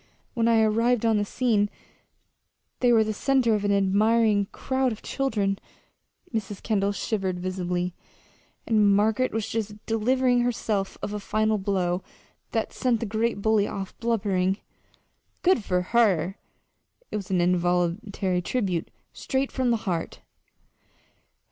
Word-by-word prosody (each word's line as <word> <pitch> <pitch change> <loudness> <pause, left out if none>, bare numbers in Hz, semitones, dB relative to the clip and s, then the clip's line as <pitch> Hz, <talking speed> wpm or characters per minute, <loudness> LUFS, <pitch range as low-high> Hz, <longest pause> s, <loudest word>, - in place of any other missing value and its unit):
When 230 -2 +1
I 230 -1 +4
arrived 230 +2 +2
on 225 -1 +3
the - - +1
scene 210 -2 +1 1.1
they 245 -1 +4
were 225 -2 +5
the 215 0 -2
center 255 0 +2
of 210 -1 0
an 205 - +1
admiring 205 +1 +3
crowd 260 -1 0
of 220 - -7
children," 210 -8 -1 0.7
Mrs. 205 -3 -4
Kendall 200 -2 +1
shivered 195 -3 -2
visibly 180 -1 -2 0.7
"and 210 -3 +4
Margaret 220 +5 +2
was 220 -1 -2
just 215 -2 -3
delivering 245 +3 +2
herself 220 -5 -1
of 205 - -3
a 210 - -3
final 215 +1 0
blow 185 -2 0 0.5
that - - -2
sent 245 -4 +1
the 230 - -2
great 220 0 -1
bully 220 -2 +3
off 195 -1 -6
blubbering." 195 -5 +1 0.9
"Good 360 - +3
for 180 -2 0
her!" 195 -6 +3 0.8
it - - -3
was 200 -3 -4
an 185 -2 +1
involuntary 180 +2 0
tribute, 185 -5 -1 0.2
straight 265 0 -2
from 260 -2 0
the 235 - +3
heart. 175 -4 -3
210 Hz, 135 wpm, -26 LUFS, 195-230 Hz, 1.1 s, were